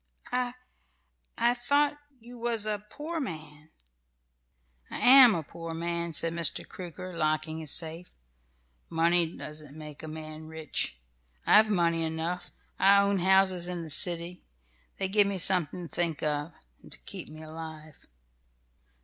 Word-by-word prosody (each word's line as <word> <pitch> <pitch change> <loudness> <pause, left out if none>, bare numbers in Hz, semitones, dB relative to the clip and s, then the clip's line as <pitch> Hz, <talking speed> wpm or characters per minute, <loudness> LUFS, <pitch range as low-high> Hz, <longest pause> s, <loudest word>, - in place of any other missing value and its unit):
"I 250 0 -1 0.8
I 240 +1 +3
thought 285 +4 +2 0.2
you 240 +1 -12
was 230 -2 +1
a 210 -1 -2
poor 320 +5 -5
man." 155 - -7 1.2
"I - - -5
am 255 -3 +8
a 165 - -2
poor 165 +2 -7
man," 170 0 -2
said 165 +2 0
Mr. 170 -2 +1
Crooker, 185 0 -8
locking 155 0 -1
his 155 -2 -4
safe. 165 +3 0 0.8
"Money 170 +1 +2
doesn't 150 -1 -8
make 150 -2 -9
a 160 - -7
man 155 0 -8
rich. 160 - -3 0.5
I've 215 +1 +6
money 170 -4 +2
enough. 165 +2 -3 0.3
I 200 +1 +6
own 200 -1 +1
houses 190 -1 +3
in 175 -1 -4
the 160 - -7
city. 175 +3 +2 0.6
They 195 - -1
give 205 +1 +3
me 200 -1 -1
something 180 -1 +1
to - - -22
think 170 -4 -1
of, 150 +1 -1 0.3
and - - -16
so - - -3
keep - - -7
me 155 +1 -10
alive. 155 -1 -10
170 Hz, 145 wpm, -29 LUFS, 155-200 Hz, 1.2 s, am